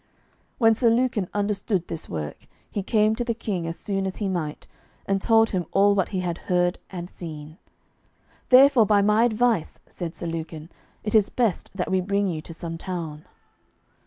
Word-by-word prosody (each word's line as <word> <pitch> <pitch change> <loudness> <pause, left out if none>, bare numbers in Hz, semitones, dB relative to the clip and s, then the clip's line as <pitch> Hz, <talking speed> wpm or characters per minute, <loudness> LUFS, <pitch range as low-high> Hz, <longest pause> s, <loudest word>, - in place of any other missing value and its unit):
When 225 -2 +5
Sir 230 +1 +3
Lucan 230 -5 +1
understood 200 -2 -1
this 165 - -6
work, 75 -3 -6 0.2
he 205 - -2
came 215 +2 +2
to 240 - -2
the 235 -1 -2
King 190 -7 -3
as 165 - -4
soon 195 -1 -2
as 190 - -4
he 205 - -2
might, 170 -6 -3 0.4
and 195 0 0
told 225 0 +4
him 180 -4 -2
all 200 +1 +5
what 195 -3 +1
he 190 -2 -2
had 175 -2 -3
heard 175 0 0
and 175 -2 -6
seen. 155 -2 -9 0.9
"Therefore 260 -3 +7
by 205 -1 +4
my 210 +3 +4
advice," 235 -5 +1
said 170 -2 -6
Sir - - -6
Lucan, 160 -1 -5 0.3
"it 210 - -3
is 215 -2 +4
best 230 -8 0
that 185 -1 -2
we 190 0 +2
bring 200 +2 0
you 160 -4 -3
to 160 - -10
some 165 0 -6
town." 165 -5 -5
195 Hz, 185 wpm, -24 LUFS, 170-215 Hz, 0.9 s, Therefore